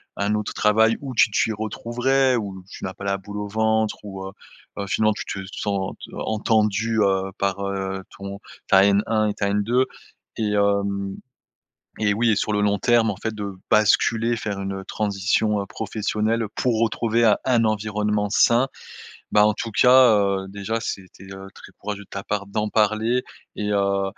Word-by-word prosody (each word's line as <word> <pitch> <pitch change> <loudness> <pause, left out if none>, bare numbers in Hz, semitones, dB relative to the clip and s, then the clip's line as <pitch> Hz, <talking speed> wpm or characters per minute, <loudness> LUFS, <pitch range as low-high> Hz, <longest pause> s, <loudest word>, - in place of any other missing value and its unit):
un 100 +1 0
autre 105 -1 -3
travail 110 +1 +3
où 135 -3 -6
tu 115 - +4
t'y 110 - +1
retrouverais, 120 +5 0
où 100 -5 -4
tu - - -10
n'as 95 - -4
pas 100 - -11
«la 100 0 0
boule 100 +2 -8
au 105 - -4
ventre», 110 +1 +1
où 95 -2 -7
heu - - -7 0.5
heu, 100 - -3
finement 110 +2 +2
tu - - -6
te 100 - -5 0.2
sentes 100 -2 -2 0.2
entendue, 110 0 0
heu, 95 -1 +1
par, 100 0 -1
heu, 95 -1 -3
ton 100 0 -7 0.3
ta 95 - +6
N1 105 +2 +2
et - - -5
ta 100 0 -1
N2 115 +6 +2 0.5
et, 105 -2 0
hem 100 -1 0 0.8
et 105 -1 +2
oui 115 +1 +2
et - - +3
sur 105 +1 -1
le 105 - +1
long 100 -1 +1
terme 120 -1 +3
en - - -5
fait 110 +1 -4
de 100 -2 -5 0.2
basculer, 115 +2 +3
faire 105 -3 -4
une, 95 0 -3
heu, 95 - -7
transition, 105 0 0
heu, - - -5
professionnelle 110 +1 -1
pour 120 -3 0
retrouver 115 0 +1
un 110 -3 +5
un 120 -3 +3
environnement 105 -1 0
sain. 120 +4 +4 0.7
Bah 105 0 +6
en 105 - +4
tout 115 - -4
cas, 125 +1 +6
heu, 100 -1 0
déjà 100 +3 -3
c'était, 95 -4 -7
heu, 95 0 -9
très - - -14
courageux 100 0 -5
de - - -29
ta 100 - -5
part 105 -1 -2
d'en 105 +1 -2
parler 110 +3 +2 0.3
et 105 - -3
heu, 100 -1 +1
105 Hz, 185 wpm, -23 LUFS, 100-110 Hz, 0.8 s, ta